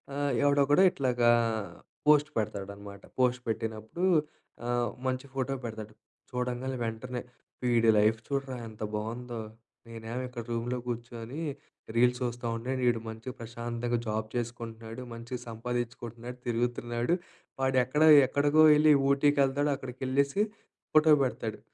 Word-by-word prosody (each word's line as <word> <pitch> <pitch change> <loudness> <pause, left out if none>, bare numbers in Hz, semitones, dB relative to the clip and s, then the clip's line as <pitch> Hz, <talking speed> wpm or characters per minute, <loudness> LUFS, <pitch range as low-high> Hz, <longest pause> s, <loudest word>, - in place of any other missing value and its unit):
ఆహ్, 145 0 0
ఎవడోకడు 145 +2 +4
ఇట్లాగా 125 -5 +2 0.8
post 150 0 +6
పెడతాడనమాట. 100 -1 -4 0.2
Post 125 -1 +2
పెట్టినప్పుడు, 110 - -3 0.6
ఆహ్, 120 -1 +1 0.2
మంచి 130 +1 -1
ఫోటో 135 0 -1
పెడతాడు. 110 -2 -6 0.4
చూడంగానే 125 +1 -2
వెంటనే 120 +2 -4 0.4
వీడి 120 -2 +3
లైఫ్ 110 +2 +4
చూడరా 135 -2 -2
ఎంత 110 -1 -8
బావుందో, 115 +3 -4 0.5
నేనేమో 115 +2 -5
ఇక్కడ 125 -2 -7
రూమ్‌లో 120 +2 -1
కూర్చొని 120 +3 -5 0.5
రీల్స్ 125 +1 +4
చూస్తా 120 0 -3
ఉండే, 120 +3 -4 0.2
ఈడు 120 -1 +3
మంచిగా 115 +3 -7
ప్రశాంతంగా 120 +1 -3
జాబ్ 110 0 -2
చేసుకుంటున్నాడు, 115 -1 -5
మంచిగా 120 +2 -6
సంపాదించుకుంటున్నాడు, 120 +1 -5
తిరుగుతున్నాడు. 120 +4 0 0.5
వాడు 130 0 +2
ఎక్కడ 150 +4 -1 0.3
ఎక్కడికో 145 +3 +4
వెళ్లి 150 0 +6 0.2
ఊటీకెళ్తాడు, 140 0 +3
అక్కడికి 130 -1 -9
ఎళ్ళేసి 140 +8 +2 0.5
ఫోటో 155 0 +6
పెడతాడు. 110 -4 -4
120 Hz, 115 wpm, -29 LUFS, 115-130 Hz, 0.8 s, post